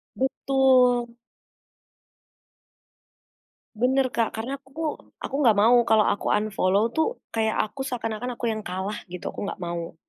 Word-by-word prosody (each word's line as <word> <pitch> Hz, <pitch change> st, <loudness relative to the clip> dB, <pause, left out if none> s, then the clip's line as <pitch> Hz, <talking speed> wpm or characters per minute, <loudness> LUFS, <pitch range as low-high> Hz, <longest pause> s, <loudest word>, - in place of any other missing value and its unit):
Betul. 255 Hz, -3 st, +2 dB, 2.6 s
Benar 260 Hz, +1 st, +2 dB
Kak, 230 Hz, -2 st, -1 dB
karena 250 Hz, +5 st, -4 dB
aku 265 Hz, -1 st, -24 dB, 0.5 s
aku 275 Hz, -, -4 dB
nggak 230 Hz, -6 st, +5 dB
mau 230 Hz, +3 st, +6 dB
kalau 220 Hz, -1 st, +5 dB
aku -, -, -3 dB
unfollow 205 Hz, -1 st, +1 dB
tuh, 320 Hz, -, +2 dB, 0.3 s
kayak 220 Hz, -1 st, 0 dB
aku 215 Hz, +6 st, -9 dB
seakan-akan 240 Hz, 0 st, -3 dB
aku 240 Hz, -, -5 dB
yang 215 Hz, 0 st, -4 dB
kalah 190 Hz, +3 st, -4 dB
gitu, 180 Hz, -, -7 dB
aku -, -, -9 dB
nggak -, -, -6 dB
mau. 170 Hz, -1 st, -5 dB
230 Hz, 130 wpm, -25 LUFS, 210-260 Hz, 2.6 s, mau